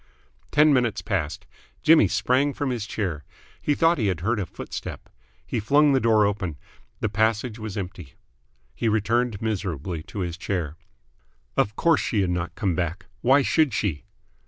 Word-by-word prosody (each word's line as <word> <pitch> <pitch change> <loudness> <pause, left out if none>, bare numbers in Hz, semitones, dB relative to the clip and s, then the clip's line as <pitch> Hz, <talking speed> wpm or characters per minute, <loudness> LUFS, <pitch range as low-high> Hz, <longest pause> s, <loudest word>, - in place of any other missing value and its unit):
Ten 150 0 +5
minutes 120 -4 +1
passed. 85 -8 -2 0.4
Jimmy 155 -9 +6
sprang 135 +8 +1
from 140 -3 -1
his 115 -4 -3
chair. 85 -10 -3 0.4
He 145 - +1
thought 165 0 +3
he 110 - +1
had 90 -4 -1
heard 110 +5 0
a 95 - -2
footstep. - - -7 0.4
He - - -2
flung 145 +7 +4
the 135 - +4
door 110 -3 +4
open. 100 -7 -2 0.4
The - - +1
passage 110 +2 0
was 110 -2 -5
empty. 95 -7 -7 0.6
He 115 - 0
returned 110 +1 0
miserably 90 -6 -3
to 100 - -6
his 85 -1 -3
chair. 85 -6 -2 0.8
Of 105 - +1
course 165 +1 +3
she 105 - 0
had 90 -2 0
not 85 0 -3
come 100 -5 0
back. 90 +1 -3 0.2
Why 135 +3 +5
should 150 -7 +2
she? 100 -5 -1
105 Hz, 165 wpm, -25 LUFS, 90-125 Hz, 0.8 s, Jimmy